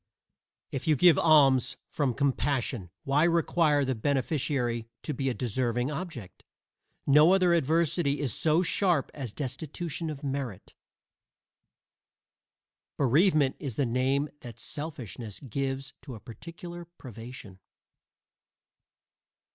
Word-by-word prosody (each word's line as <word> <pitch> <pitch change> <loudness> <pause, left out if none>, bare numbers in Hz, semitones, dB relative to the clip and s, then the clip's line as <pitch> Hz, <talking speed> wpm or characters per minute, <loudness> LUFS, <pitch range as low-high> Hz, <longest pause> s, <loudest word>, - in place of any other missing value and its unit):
If 135 +1 -4
you 155 - +5
give 165 +1 +6
alms 140 -6 +4
from 135 -6 -1
compassion, 130 -6 -1
why 140 +3 +2
require 165 -3 +3
the 130 - 0
beneficiary 130 -2 -1 0.2
to 150 - -3
be 135 0 -1
"a - - -1
deserving 125 +2 -1
object?" 150 - -7 0.6
No 150 +6 +6
other 180 -2 +3
adversity 160 -2 +1
is 135 -7 0
so 160 +3 +3
sharp 175 -5 +1
as 130 -6 -5
destitution 155 +5 -4
of 150 -1 -7
merit. 135 -7 -4 2.2
Bereavement 145 - +3
is 135 -7 -5
the 140 - +1
name 130 +4 +1
that 115 -4 -10
selfishness 125 - -6
gives 135 +1 -4
to 130 -5 -8
a - - -10
particular 170 - -9
privation. 120 - -11
140 Hz, 110 wpm, -28 LUFS, 125-155 Hz, 2.2 s, give